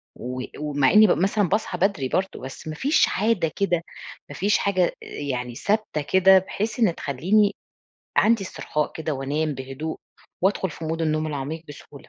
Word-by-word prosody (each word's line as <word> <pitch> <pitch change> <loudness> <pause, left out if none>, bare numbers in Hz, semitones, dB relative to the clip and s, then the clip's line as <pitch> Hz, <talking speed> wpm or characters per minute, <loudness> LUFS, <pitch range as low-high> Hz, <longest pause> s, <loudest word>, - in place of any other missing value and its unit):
و 125 +1 -5 0.2
ومع 145 -3 +2
إني 215 0 +7
بابقى 175 +1 +2
مثلًا 200 -2 +1
باصحى 200 -3 -1
بدري 185 -8 +1
برضه، 190 +1 -1
بس 135 +4 -9
ما 155 - -4
فيش 285 - +3
عادة 195 -7 +1
كده، 175 -4 +1 0.5
ما - - -8
فيش 205 +3 +2
حاجة 185 -3 +2 0.2
أ - - -10
يعني 125 -4 -4
ثابتة 205 - -1
كده، 190 +6 +5
بحيث 215 +5 -4
إن 200 -8 +3
تخلّيني 195 +10 +1 0.6
عندي 220 -1 +4
استرخاء 150 -4 -3
كده 160 -1 -3
وأنام 145 +3 -1
بهدوء 135 +4 -5 0.5
وأدخل 190 -2 +1
في 160 - -8
مود 165 +1 -2
النوم 155 0 0
العميق 150 +2 -4
بسهولة. 145 -1 -12
165 Hz, 170 wpm, -24 LUFS, 145-200 Hz, 0.6 s, إني